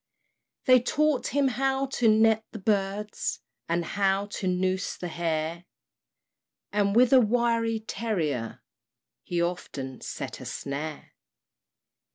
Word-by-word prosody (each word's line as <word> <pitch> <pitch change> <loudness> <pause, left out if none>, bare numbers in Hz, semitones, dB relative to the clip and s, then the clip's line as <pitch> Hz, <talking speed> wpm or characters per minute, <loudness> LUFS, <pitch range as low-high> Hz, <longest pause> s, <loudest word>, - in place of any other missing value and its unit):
They 255 -1 +7
taught 300 +2 +1
him 280 0 +2
how 270 +1 0
to 250 -3 0
net 220 0 +4
the - - -5
birds, 205 0 -1 0.3
And 170 0 0
how 195 +1 +1
to 190 - -3
noose 185 +1 0
the 175 - -5
hare; 165 0 -2 1.1
And 200 0 +1
with 250 +2 +5
a 260 - +8
wiry 230 -1 +1
terrier, 160 - -2 0.6
He 175 - -3
often 140 -7 -4
set - - -6
a - - -8
snare. 145 +2 -5
205 Hz, 120 wpm, -27 LUFS, 175-235 Hz, 1.1 s, a